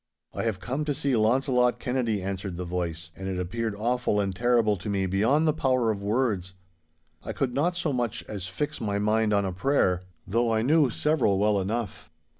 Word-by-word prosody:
'I - - -3
have 110 -5 -1
come 130 +9 -3
to 145 -2 -1
see 140 -2 0
Launcelot 125 +2 +2
Kennedy,' 120 -6 -1
answered 95 -2 -4
the 90 - -4
voice, 85 -1 -4
and 95 - -6
it 95 - -3
appeared 110 +4 -2
awful 120 -1 0
and 100 -2 -1
terrible 120 -2 +3
to 95 - -6
me 100 -1 0
beyond 115 - +2
the 155 - +3
power 130 -6 +1
of 100 -2 -4
words. 100 -4 -1 0.7
I - - -5
could 130 -3 -1
not 165 +7 +1
so 165 -4 -1
much 120 -4 -2
as 100 -4 -6
fix 125 +11 -3
my 100 -2 -1
mind 105 +1 +2
on 100 -1 +2
a 95 - -2
prayer, 90 -4 +1 0.2
though 115 +4 +1
I 110 0 +1
knew 150 +1 +4
several 130 -7 +1
well 105 0 +2
enough. 110 +2 -4
110 Hz, 200 wpm, -27 LUFS, 95-125 Hz, 0.7 s, knew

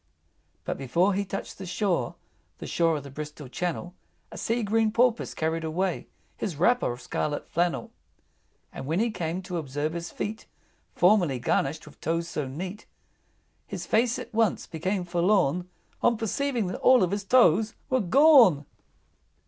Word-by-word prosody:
IV. 75 +1 -43
But - - -3
before 170 +9 +2
he 200 +2 0
touched 195 0 -6
the 190 - -6
shore, 175 - -1 0.4
The - - -8
shore 165 -2 +1
of 145 - -7
the 140 - -10
Bristol 150 0 -7
Channel, 175 +6 -4 0.4
A - - -9
sea 230 +1 -1
green 220 +1 +2
Porpoise 235 +1 +1
carried 160 +1 -1
away 175 +3 -2 0.3
His 190 -7 -3
wrapper 210 - +2
of 120 +1 -8
scarlet 145 +4 -3
flannel. 175 +1 -1 0.8
And 135 - -7
when 165 +5 0
he 230 +1 +1
came 175 -1 -3
to 180 -1 -4
observe 145 +1 -3
his 170 0 -5
feet, 215 +2 -5 0.5
Formerly 180 -7 +4
garnished 135 +5 -1
with - - -16
toes 165 +1 -1
so 150 -4 -3
neat, 180 +9 -7 0.8
His - - -6
face 230 +2 +2
at 235 - -8
once 225 -3 +1
became 180 +3 -2
forlorn 175 -1 +1 0.3
On 235 - +3
perceiving 235 +1 -1
that 180 - -4
all 250 -8 +6
his 200 +3 -3
toes 220 -1 +4 0.2
were 260 -1 +3
gone! 235 - +6
180 Hz, 160 wpm, -27 LUFS, 155-215 Hz, 0.8 s, all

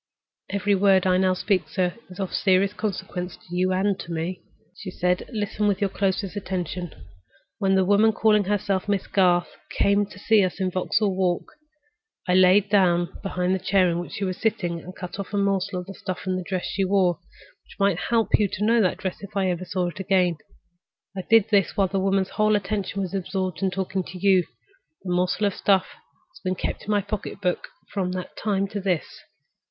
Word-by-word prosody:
"Every 200 0 +1
word 195 -1 +4
I 185 -1 +3
now 185 0 +2
speak, 185 -1 0
sir, 180 -2 0 0.2
is 180 - -12
of 190 -2 -3
serious 190 0 +2
consequence 190 -4 -4
to 175 - -10
you 185 +1 +2
and 190 +1 +1
to 170 - -7
me," 170 +3 -3 0.3
she 190 - -7
said. 180 0 -1
"Listen 210 -1 -1
with 200 -2 +1
your 200 -2 0
closest 195 0 -1
attention. 180 -3 -4 0.7
When 195 -2 +2
the 190 -1 +3
woman 205 +3 +4
calling 210 -1 +3
herself 200 0 -1
Miss 200 -2 0
Garth 180 -3 +2
came 200 0 +2
to 200 - -14
see 210 0 +4
us 185 +1 -2
in 185 -1 0
Vauxhall 190 +2 0
Walk, 180 -2 0 0.8
I 180 - +2
knelt 185 +2 +5
down 175 -4 +3
behind 180 -2 -1
the 190 - 0
chair 185 -1 +3
in 170 - -1
which 175 - -7
she 200 - -4
was 185 -1 -2
sitting 195 -7 -1
and 175 - -11
I - - -15
cut 180 +1 -7
a 200 +1 -3
morsel 195 -2 0
of 195 - -8
stuff 185 -2 -5
from 185 -1 -2
the 185 - -2
dress 185 0 -3
she 195 - -1
wore, 185 -2 +2 0.4
which - - -18
might 195 -3 +2
help 230 -2 +1
me 210 - +4
to 200 +2 -3
know 230 +1 +4
that 185 - +1
dress 185 -2 -4
if 200 0 -7
I 190 -2 +2
ever 180 +1 -4
saw 180 -1 -1
it 175 - -10
again. 185 -3 +2 0.8
I 190 - -3
did 225 -1 +5
this 200 -5 +2
while 195 -2 +3
the 195 +1 -1
woman's 195 0 +1
whole 215 0 +2
attention 200 -1 -2
was 185 - -5
absorbed 185 -3 -3
in 190 - +2
talking 190 0 -2
to 185 - -8
you. 190 -1 +4 0.6
The 180 -2 -2
morsel 180 +3 +1
of 200 - +1
stuff 190 -1 +2 0.5
has - - -17
been 185 -1 -1
kept - - -4
in - - -9
my 205 -1 +3
pocketbook 200 -2 -3 0.3
from 185 -3 -1
that 185 0 -6
time 200 -2 0
to 205 - -4
this. 185 -4 0
190 Hz, 205 wpm, -24 LUFS, 180-200 Hz, 0.8 s, knelt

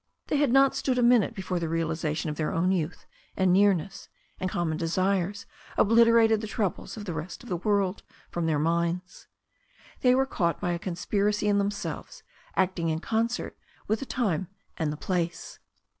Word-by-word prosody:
They 295 - +2
had 285 -3 +2
not 270 +1 +5
stood 255 -2 0
a 245 - +3
minute 235 -3 +4
before 185 -2 -2
the 165 -1 -2
realization 160 -1 -1
of - - -5
their 155 0 -1
own 180 +3 +1
youth 175 -2 -2 0.3
and 190 -2 +3
nearness 195 -2 +2 0.3
and 185 - -1
common 170 -3 -1
desires 185 +4 0 0.3
oblit 230 +2 +6
erated 225 -2 +4
the 215 - -4
troubles 210 -1 -3
of 210 - -6
the 175 - -4
rest 160 +7 -6
of 245 - -11
the 180 - -1
world 200 0 0 0.3
from 170 -1 -1
their 155 -2 +2
minds. 170 +3 -1 0.7
They 250 -1 +4
were 265 +1 +3
caught 170 - -1
by 175 - -1
a 170 - -2
conspiracy 200 +4 -1
in 205 -1 +3
themselves 200 0 -4 0.3
acting 180 -3 +1
in 160 - 0
concert 225 +7 -1 0.3
with 215 +1 +1
the 275 - -6
time 190 -8 -1 0.3
and 160 -4 -1
the 150 - -5
place. 170 -1 -3
185 Hz, 180 wpm, -27 LUFS, 170-215 Hz, 0.7 s, oblit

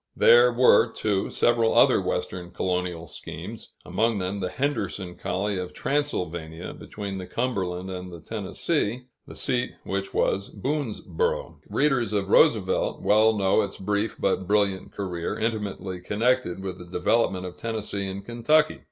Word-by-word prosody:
There 120 +1 +7
were, 125 +1 +5
too, 100 -3 -1
several 115 -1 +2
other - - +6
Western 90 -1 -3
colonial 90 -2 -2
schemes, - - -9
among 115 -1 +1
them 95 +1 -2
the 90 -2 -2
Henderson 100 -8 -2
colony 95 +2 -2
of 90 -1 -6
Transylvania, 85 - -2
between 100 -2 -6
the 90 - -7
Cumberland 95 -7 -2
and 90 0 -6
the 85 - -9
Tennessee, 110 - -2 0.2
the - - -10
seat 125 -1 -1
of - - -12
which 95 0 -2
was 100 +1 0
Boonesborough. 155 - -2
Readers 120 -8 +1
of 100 -2 0
Roosevelt - - +3
well 110 +1 +4
know 95 +2 +3
its 100 -2 -4
brief 105 +2 -1
but 95 -1 0
brilliant 100 -2 +1
career, 90 -4 -3
intimately 105 -4 -3
connected 105 -1 0
with 95 -1 -5
the 90 - -9
development 95 +1 +1
of 90 - -7
Tennessee 105 -3 -3
and 95 +1 -6
Kentucky. 150 +7 +2
100 Hz, 145 wpm, -26 LUFS, 95-115 Hz, 0.2 s, There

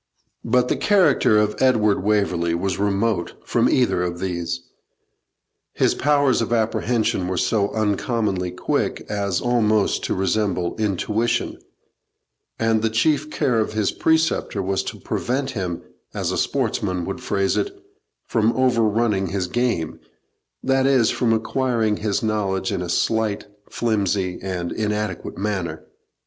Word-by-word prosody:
But 125 +2 +2
the - - +1
character 190 - +4
of 105 0 +1
Edward 110 -7 +3
Waverley 90 -5 +1
was 95 +2 -2
remote 100 -1 0
from - - +2
either 125 -8 +2
of 90 -1 -2
these. 85 -2 -3 1.1
His - - +2
powers 145 -3 +2
of 115 - -2
apprehension 110 -3 0
were 90 0 -2
so 100 0 +1
uncommonly 105 -3 0
quick 90 - -2
as 100 -3 -1
almost 110 -4 +2
to - - -1
resemble 95 -2 0
intuition, 110 +3 -1 1.0
and 115 -1 +2
the 115 - +1
chief 145 +6 +1
care 135 -7 +1
of 110 - -1
his 110 -3 +1
preceptor 160 -9 +1
was 95 +1 0
to - - -6
prevent 135 +2 -2
him, 90 -5 -4 0.3
as - - -1
a - - -2
sportsman 90 -2 -1
would - - -5
phrase 100 -1 0
it, 400 - 0 0.6
from 115 0 +1
over 130 -3 +2
running 105 -3 +1
his 95 -1 -2
game 105 -6 -1 0.6
that 135 0 +2
is, 130 -5 +4
from 120 -2 +1
acquiring 115 -1 0
his 105 0 -1
knowledge 100 -3 -1
in 95 -3 -2
a 90 - -4
slight, 110 +3 0 0.2
flimsy, 100 -5 -1
and 90 -2 -3
inadequate 105 -3 -3
manner. 95 -6 -3
105 Hz, 135 wpm, -22 LUFS, 95-115 Hz, 1.1 s, character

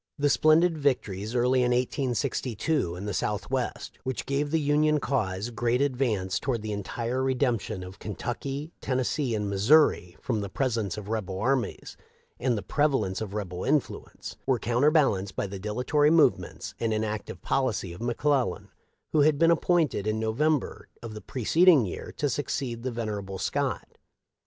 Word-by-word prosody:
The 145 -1 +2
splendid 160 +2 +4
victories 110 -6 -1
early 125 +1 +3
in 125 -1 +2
1862 125 - -1
in 95 +3 -6
the 105 - -3
south 105 +4 -2
west, 130 -2 -3
which 130 -2 -3
gave 140 +1 -1
the 160 +2 +1
Union 150 +1 +2
cause 110 -6 -1
great 120 +1 0
advance 120 -10 0
toward 120 -5 -2
the 110 - -3
entire 115 +5 -3
redemption 125 -7 0
of 90 +1 -10
Kentucky, 135 +8 -4
Tennes 130 -1 0
see, 135 -7 -1
and 105 -1 -2
Missouri 100 - +3
from 115 -5 -2
the 100 - -4
presence 115 -8 -1
of 105 -1 -7
rebel 100 -4 -3
armies 130 +3 -1 0.4
and 120 -2 +1
the 100 - -4
prevalence 130 -9 0
of 105 -2 -5
rebel 90 -4 -4
influence, 135 -6 -2
were 130 - +3
counter 120 +6 +2
balanced 105 - +2
by - - -1
the 100 0 -6
dilatory 125 +9 +1
movements 160 -1 +2
and 115 -1 0
inactive 110 -1 -4
policy 115 -9 0
of 85 - -11
McClellan, 130 +3 0 0.4
who 155 - +3
had 150 0 +4
been 165 +2 +5
appointed 165 - +1
in 110 0 0
No 110 0 -1
vember 150 +3 0 0.2
of 115 -2 -6
the 105 - -8
preceding 155 - +4
year 90 - -6
to 145 - +1
succeed 130 -3 -2
the 130 - -2
vener 110 -3 -3
able 95 0 -7
Scott. - - -2
120 Hz, 165 wpm, -27 LUFS, 105-140 Hz, 0.4 s, been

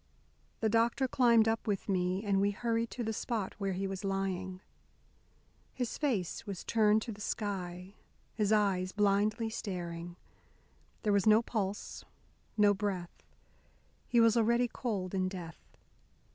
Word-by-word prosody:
The 220 - +3
doctor 230 +4 +2
climbed 235 -3 +4
up 225 +1 0
with 200 -2 -1
me, 185 0 0
and 200 -2 +2
we 200 - +3
hurried 230 +2 -1
to 245 - -4
the 225 0 -2
spot 220 -3 -2
where 195 -1 -1
he 190 +2 -2
was 195 0 -4
lying. 190 -1 -2 1.2
His 245 -3 -2
face 225 - -1
was 195 -3 -5
turned 215 -1 +3
to 235 - -5
the 205 -1 -10
sky, 185 -3 -4 0.4
his 210 -2 0
eyes 195 -3 +2
blindly 210 +2 +1
staring; 175 -4 -5 0.9
there 210 - +2
was 200 +1 +2
no 215 +2 +6
pulse, 205 -3 -3 0.5
no 205 -1 +5
breath; 190 -4 -4 0.9
he 240 - +3
was 230 -1 +5
already 235 +2 +3
cold 205 -7 -3
in 185 -1 0
death. 175 -4 -10
205 Hz, 145 wpm, -32 LUFS, 190-225 Hz, 1.2 s, no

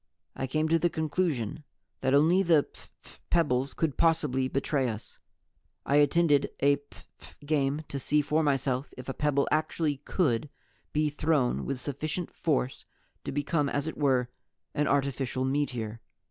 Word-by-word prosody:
I 130 - -3
came 155 +4 0
to 165 +1 +4
the 175 - +2
conclusion 155 - -1 0.4
that 130 +1 +2
only 165 +6 +5
the 165 -6 +4
phph - - -16
pebbles 140 -6 +1
could 160 -4 -1
possibly 150 -6 +2
betray 135 -1 0
us. 110 -1 -8 0.7
I 140 - +3
attended 145 0 +4
a 140 0 +4
phph 85 - -18
game 145 0 0
to 140 - -4
see 150 +2 +2
for 155 +2 +1
myself 135 -2 0
if 125 - -9
a 135 - -2
pebble 145 -1 +1
actually 155 -1 0
could 145 -3 0 0.4
be 150 0 +1
thrown 150 -4 +1
with 135 -2 -3
sufficient 155 +6 -4
force 135 -5 -1 0.4
to - - -3
become, 145 +1 0
as 145 +1 -1
it 160 - -4
were, 130 -4 +2 0.4
an 150 - +1
artificial 135 -2 0
meteor. 125 -5 -2
145 Hz, 150 wpm, -29 LUFS, 130-155 Hz, 0.7 s, only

